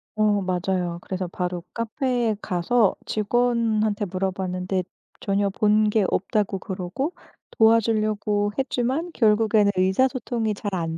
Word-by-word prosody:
어 210 -2 +2
맞아요. 180 -1 -1
그래서 185 -1 -4
바로 180 0 -4
카페에 230 0 -1
가서 190 +5 +2
직원한테 220 -1 +1
물어봤는데 185 0 -2 0.4
전혀 200 0 +1
본 210 +1 +2
게 210 -2 +2
없다고 195 0 0
그러고 195 - -4 0.4
도와주려고 215 -2 +2
했지만 270 +6 -1
결국에는 215 -2 +3
의사소통이 225 +3 +1
잘 205 0 -5
안 165 -1 -3
210 Hz, 285 characters per minute, -24 LUFS, 190-225 Hz, 0.4 s, 결국에는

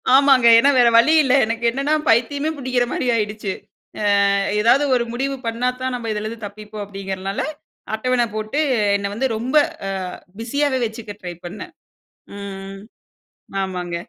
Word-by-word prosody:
ஆமாங்க. 270 -3 +5
ஏன்னா, 275 +5 +5
வேற 240 - +6
வழி 305 +7 +5
இல்லை. 265 +1 +3
எனக்கு, 230 +1 -4
என்னன்னா 275 +4 -1
பைத்தியமே 280 +7 +2
புடிக்கிற 255 -2 0
மாரி - - -2
ஆயிடுச்சு. 210 -2 -2 0.8
"அ - - +3 0.3
ஏதாவது 245 +6 +4
ஒரு 240 -1 +1
முடிவு 270 +2 -2
பண்ணாத்தான், 250 +2 -2
நம்ம 230 -2 -4
இதுலேருந்து 215 +1 -5
தப்பிப்போம்." 210 +1 -9
அப்படிங்கிறனால 195 -1 -4 0.5
அட்டவணை 245 +2 +1
போட்டு 215 +7 -2 0.4
என்னை 200 0 -3
வந்து 265 +4 0
ரொம்ப 255 +6 -2 0.3
அ - - -2 0.5
பிஸியாவே 265 +3 0
வச்சுக்க 220 -1 -6
ட்ரை 175 -1 -6
பண்ணேன். 215 - -8 0.7
ம், 200 0 -6 0.3
ம். 195 - -10 0.8
ஆமாங்க. 180 -2 -4
230 Hz, 140 wpm, -20 LUFS, 210-260 Hz, 0.8 s, வேற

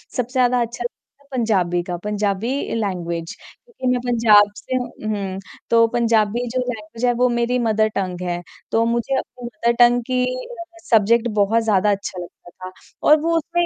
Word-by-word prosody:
सबसे 245 0 -2
ज़्यादा 250 -1 +3
अच्छा 235 +1 -4
लगता 275 +3 -10
था - - -28
पंजाबी 185 -7 +1
का, 175 -1 -4
पंजाबी 210 +1 -1 0.3
लैंग्वेज। 170 -6 -3
क्योंकि 460 - -9
मैं 250 - 0
पंजाब 215 -4 +5
से 255 - -4
हूँ 250 -1 -2 0.2
उहुँ, 195 -3 -3 0.3
तो 230 0 +5
पंजाबी 230 0 +1
जो - - +2
लैंग्वेज 230 -1 -4
है 245 - +3
वो 250 - +4
मेरी 240 +1 0
मदर 215 0 +3
टंग 185 -2 -3
है, 175 0 -2 0.3
तो 225 0 +3
मुझे 235 +3 0
अपनी 245 0 -6
मदर 235 0 0
टंग 240 0 +6
की 250 0 +1 0.2
अ, 470 -9 -9 0.2
सब्जेक्ट 230 +1 +4
बहुत 225 +3 +3
ज़्यादा 210 -1 +2
अच्छा 195 -2 -3
लगता 175 - -15
था। 185 +1 -10 0.4
और 305 0 +7
वो 335 +1 +1
उसमें, 345 +2 0
230 Hz, 180 wpm, -21 LUFS, 200-245 Hz, 0.4 s, और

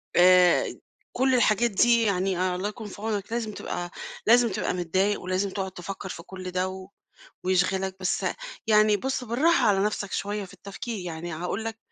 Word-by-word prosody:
آآ 180 0 +5 0.4
كل 260 +1 +3
الحاجات 235 -1 +3
دي! 235 +3 +4
يعني 185 -2 0
الله 190 +3 -2
يكون 215 0 -8
في 200 - -10
عونك 215 -1 -3
لازم 230 -2 -2
تبقى 175 -2 -5 0.4
لازم 240 +1 +6
تبقى 195 -1 -1
متضايق 185 +4 0
ولازم 185 +2 -1
تقعد 190 0 -4
تفكَّر 190 +1 -7
في 170 - -7
كل 185 -1 -7
ده 185 +1 -3 0.6
ويشغلَك 190 +1 +1
بس 185 - 0 0.4
يعني 215 -1 +5
بُص 260 +4 -2
بالراحة 275 +9 +3
على 195 0 +3
نفْسَك 205 -2 -2
شويّة 205 0 -2
في 185 - -13
التفكير، 205 +2 -6
يعني 170 0 -5
هاقول 180 +7 -3
لَك 225 0 -5
195 Hz, 165 wpm, -26 LUFS, 185-220 Hz, 0.6 s, لازم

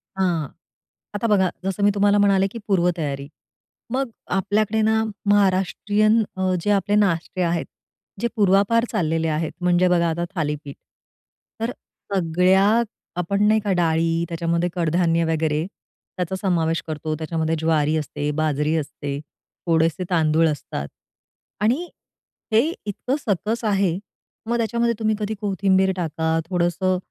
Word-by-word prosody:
हां, 175 -6 0 0.7
आता 205 +3 0
बघा, 190 -4 +3 0.2
जसं 195 +1 -1
मी 205 - +5
तुम्हाला 205 0 +3
म्हणाले 195 -1 +3
की 230 - -7
पूर्वतयारी, 165 -7 0 0.6
मग 265 0 -1 0.3
आपल्याकडे 215 +3 +1
ना 220 +1 +2 0.3
महाराष्ट्रीयन 205 +3 +3
अ, 185 0 +1
जे 205 - +1
आपले 205 +1 +2
नाष्टे 185 -3 +1
आहेत, 170 -1 0 0.6
जे 235 - +2
पूर्वापार 205 +3 +3
चाललेले 165 -6 0
आहेत, 155 +1 -1
म्हणजे 180 0 +3
बघा 170 -1 +3
आता 170 +1 -2
थालीपीठ, 150 -3 -3 0.9
तर 230 - 0 0.4
सगळ्या 180 +1 +3 0.5
आपण 200 +4 0
नाही 215 +1 +4
का 205 - 0
डाळी, 165 -1 +1
त्याच्यामध्ये 170 +1 0
कडधान्य 170 0 +2
वगैरे 155 0 0 0.5
त्याचा 180 +1 -2
समावेश 165 -4 +1
करतो. 155 0 -3
त्याच्यामध्ये 160 0 -1
ज्वारी 155 -1 +2
असते, 150 -1 -3
बाजरी 155 0 0
असते, 145 -2 -4 0.5
थोडेसे 165 +2 +2
तांदूळ 160 -2 +3
असतात 70 - -4 0.7
आणि 260 +12 +1 0.7
हे 220 - +6 0.2
इतकं 215 +6 -2
सकस 220 0 -1
आहे. 195 -4 +1 0.5
मग 235 +1 0
त्याच्यामध्ये 235 +1 +1
तुम्ही 220 0 +1
कधी 210 0 -2
कोथिंबीर 190 -1 +2
टाका, 160 -1 -1
थोडंसं 180 +1 +1
180 Hz, 130 wpm, -22 LUFS, 160-205 Hz, 0.9 s, हे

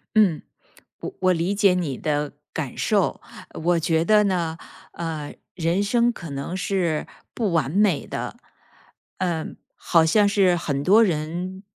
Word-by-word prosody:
嗯， 195 -8 +4 0.6
我 - - -6
我 185 -1 +4
理 175 +3 0
解 200 -2 +4
你 160 -8 -2
的 150 -1 -1 0.2
感 145 -6 -4
受， 205 -4 +1 0.4
我 175 0 +3
觉 165 0 +1
得 210 +2 +5
呢， 170 -4 -1 0.3
呃， 160 -3 -5 0.2
人 170 +3 0
生 235 +3 +2
可 170 -8 -9
能 140 +6 -4
是 180 -5 -1 0.3
不 215 -6 -1
完 155 -6 +1
美 195 -2 +2
的。 - - -5 0.8
嗯， 170 -4 -2 0.2
好 165 -2 +3
像 205 +5 +4
是 195 -3 +3
很 140 -4 -2
多 205 +9 +6
人， 180 +1 -2
175 Hz, 155 characters per minute, -23 LUFS, 160-195 Hz, 0.8 s, 多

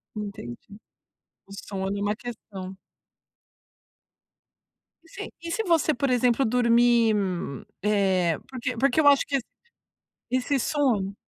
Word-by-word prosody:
Entendi. 200 - -8 0.7
O 195 - -14
sono 195 -1 -4
é - - -3
uma 205 +1 0
questão. 200 -5 -8 2.3
E 330 - -20
se - - -7
e 335 0 -5
se 450 - -1
você, 330 -5 +2
por 270 +2 -1
exemplo, 250 +1 +3
dormir, 235 -1 +4 0.7
eh, 190 -5 +2
porque 255 -1 -4
porque 275 +6 +3
eu 290 - +4
acho 280 -1 +6
que 280 - -1
esse 255 - -1 1.1
esse 270 - +1
sono 225 -9 0
235 Hz, 120 wpm, -26 LUFS, 200-270 Hz, 2.3 s, acho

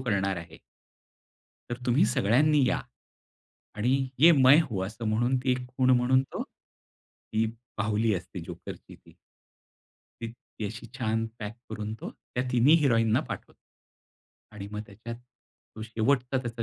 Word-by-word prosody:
करणार 100 -6 0
आहे." 85 -1 -9 1.1
तर 120 - -2
तुम्ही 120 +2 +4
सगळ्यांनी 135 +7 +3
या - - +1 1.0
आणि 130 +5 +1
ये 165 +5 +8
मैं 135 -1 +7
हूँ. 100 -10 -3
असं 110 +3 -7
म्हणून 120 +4 +2
ती 130 - +2
एक 125 0 -3
खुण 130 0 +1
म्हणून 130 +2 +3
तो - - -2
ती 110 - -7 0.3
बाहुली 110 +1 +1
असते 90 - -6
जोकरची - - -9
ती. - - -20 1.1
ती 115 -1 -4 0.3
अशी 110 +3 -7
छान 110 -2 0
पॅक 105 +1 -6
करून 110 0 -4
तो - - -5 0.2
त्या 125 - 0
तिन्ही 125 +5 +6
हिरोईन 115 -4 +3
ना - - +4
पाठवतो - - -7 1.0
आणि 100 -1 -7
मग 105 0 -4
त्याच्यात 115 +4 -8 0.6
तो 110 - -6
शेवटचा 125 +4 0
त्याचा 115 -1 -4
115 Hz, 140 wpm, -28 LUFS, 110-130 Hz, 1.1 s, ये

